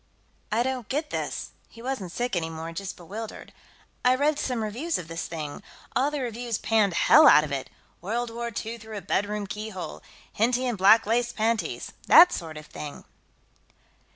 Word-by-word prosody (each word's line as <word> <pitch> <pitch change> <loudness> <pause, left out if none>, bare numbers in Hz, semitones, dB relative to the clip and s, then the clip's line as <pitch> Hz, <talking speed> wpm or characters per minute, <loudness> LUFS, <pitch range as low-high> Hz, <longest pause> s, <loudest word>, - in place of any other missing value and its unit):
"I 225 +3 +2
don't 255 -3 -3
get 295 +3 -2
this." - - -3 0.2
He - - -16
wasn't 230 -7 -4
sick, 245 +1 -2
anymore, 165 -1 -3
just 190 +3 -6
bewildered. 210 +6 -8 0.5
"I 250 +1 +5
read 295 +2 +1
some 245 -4 -1
reviews 260 +10 -2
of 170 - -7
this 165 0 -4
thing. 155 -1 -6 0.3
All 270 +3 +3
the 295 -2 -3
reviewers 235 -2 -3
panned 210 -5 +2
hell 310 - +7
out 150 - +8
of 150 - -5
it 135 -2 -3 0.3
'World 230 +6 -2
War 235 +1 -4 0.2
II 230 +1 -5
Through 220 -1 -8
a - - -5
Bedroom 205 +2 -1
Keyhole'; 210 -2 -6 0.3
'Henty 245 +4 +1
in 245 -2 0
Black 205 +4 +6
Lace 240 +2 +1
Panties' 225 0 -1 0.2
that 355 +2 +9
sort 160 -2 -5
of 155 - -9
thing." 150 -1 -8
220 Hz, 175 wpm, -26 LUFS, 185-245 Hz, 0.5 s, that